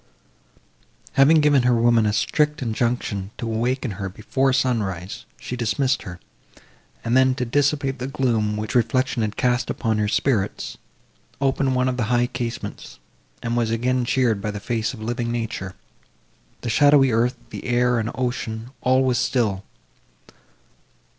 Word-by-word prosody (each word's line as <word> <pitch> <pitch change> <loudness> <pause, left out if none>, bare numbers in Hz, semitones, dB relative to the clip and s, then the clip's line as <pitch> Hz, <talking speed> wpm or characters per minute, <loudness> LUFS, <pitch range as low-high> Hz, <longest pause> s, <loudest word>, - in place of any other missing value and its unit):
Having 150 +3 +5
given 145 -2 +4
her 125 0 +3
woman 115 -1 +3
a - - +2
strict 150 +6 +1
injunction 115 -4 -1
to - - -4
awaken 120 +2 -1
her, 95 0 -4
before 130 +7 0
sunrise, 105 -9 -1
she 125 - -5
dismissed 125 +3 0
her; 90 -3 -8 0.9
and 115 +2 +1
then, 130 0 +4
to 125 - -2
dissipate 140 +1 0
the 125 - -3
gloom, 115 -6 0
which 105 0 -4
reflection 125 +1 +1
had 105 -1 -2
cast 125 0 +1
upon 110 -3 -1
her 105 - +1
spirits, 110 -1 0 0.6
opened 135 -1 +1
one 125 0 +2
of 130 -1 -1
the 120 - 0
high 120 +1 +2
casements, 120 - -6 0.5
and 115 0 -1
was 120 -2 +1
again 125 +3 0
cheered 120 -4 +1
by 105 - -2
the 105 0 -4
face 115 +1 -2
of 110 - -9
living 120 +1 -2
nature. 110 -5 -4 0.9
The 120 - -3
shadowy 140 +2 +5
earth, 120 +3 +2 0.2
the - - -7
air, 125 -1 +2
and 110 0 -2
ocean—all 125 +1 -1
was 125 -2 +1
still. 115 -7 0
120 Hz, 150 wpm, -23 LUFS, 110-130 Hz, 0.9 s, Having